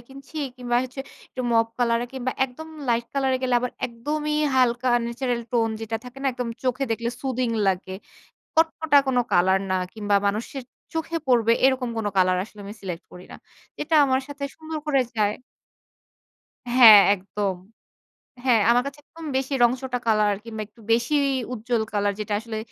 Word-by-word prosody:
কিনছি। 275 +3 -13 0.2
কিংবা 240 -1 -1
হচ্ছে 255 +2 -7 0.3
একটু 255 - -5
মপ 225 0 +4
কলার 235 -1 +2
এ - - -9
কিংবা 255 -1 -3
একদম 270 +5 -9 0.2
লাইট 235 0 +1
কলার 270 -1 +1
এ - - -6
গেলে 250 -1 +1
আবার, 250 0 -3
একদমই 300 +6 -3 0.2
হালকা 250 0 +2 0.2
ন্যাচারাল 240 0 -2
টোন 230 -2 +2
যেটা 225 0 -3
থাকে 250 +2 -10
না? 275 - 0
একদম 245 -1 -4 0.2
চোখে 260 +2 0
দেখলে 235 +1 -1
সুথিং 255 -2 -1 0.2
লাগে। 190 0 -1 0.6
কটকটা 320 -2 +4
কোন 265 - 0 0.2
কালার 190 +2 +4
না, - - +2 0.2
কিংবা 205 -2 +1
মানুষের 225 +6 -2 0.3
চোখে 325 +1 -2
পড়বে 230 -3 +4
এরকম 260 -2 +1
কোন 220 -2 -2
কালার 185 -1 +4
আসলে 210 0 -15
আমি 200 +1 -8
সিলেক্ট 180 -3 -6
করি 180 0 -11
না। - - -9 0.5
এটা 320 +2 -1
আমার 260 -1 +2
সাথে 285 0 -6
সুন্দর 315 0 -6
করে 280 -3 +3 0.2
যায় 210 -1 +2 1.3
হ্যাঁ, 235 -4 +9
একদম। 195 0 -3 0.9
হ্যাঁ, 240 -4 +4
আমার 245 +1 +3
কাছে 280 +1 -7
একদম 330 +2 -12
বেশি 265 +1 -2
রং 240 - +6
চটা 255 -2 -3
কালার, 210 -2 +3
কিংবা 220 -2 -6
একটু 225 +2 -21
বেশি 235 +5 0 0.4
উজ্জ্বল 235 0 -1
কালার 205 0 +1
যেটা 210 0 -3
আসলে 220 0 -6
240 Hz, 170 wpm, -24 LUFS, 215-265 Hz, 1.3 s, হ্যাঁ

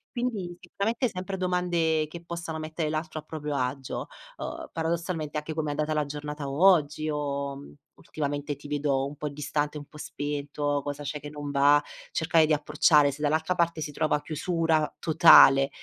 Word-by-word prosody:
Quindi 210 -8 -3
sicuramente 225 +7 -1
sempre 185 +1 -5
domande 175 -4 +1
che 170 +2 -10
possano 170 -1 -5
mettere 155 0 -3
l'altro 155 0 -3
a - - -11
proprio 150 -2 -5
agio. 130 +1 -3 0.3
Uhm, - - -6
paradossalmente 165 -2 -2
anche: 150 +1 -4
"Come 155 -1 -2
è - - -1
andata 150 +1 -1
la 150 -1 0
giornata 150 0 -5
oggi?" 155 -1 +3
O: 140 -1 -2 0.4
"Ultimamente 145 -1 -4
ti 145 +1 -12
vedo 140 -2 0
un 145 +1 -7
po' 150 - -3
distante, 150 +1 -2
un 145 - -7
po' 150 - -15
spento, 145 0 -3
cosa 145 0 -4
c'è 145 +1 -4
che 145 +1 -8
non 145 -1 -6
va?" 145 +1 +4 0.3
cercare 160 -1 +3
di 155 - +2
approcciare 150 0 +4
se 145 - -10
dall'altra 160 +4 +1
parte 170 -2 0
si 150 - -4
trova 150 0 0
chiusura 160 -1 0
totale 135 -4 +7
150 Hz, 170 wpm, -27 LUFS, 145-165 Hz, 0.4 s, totale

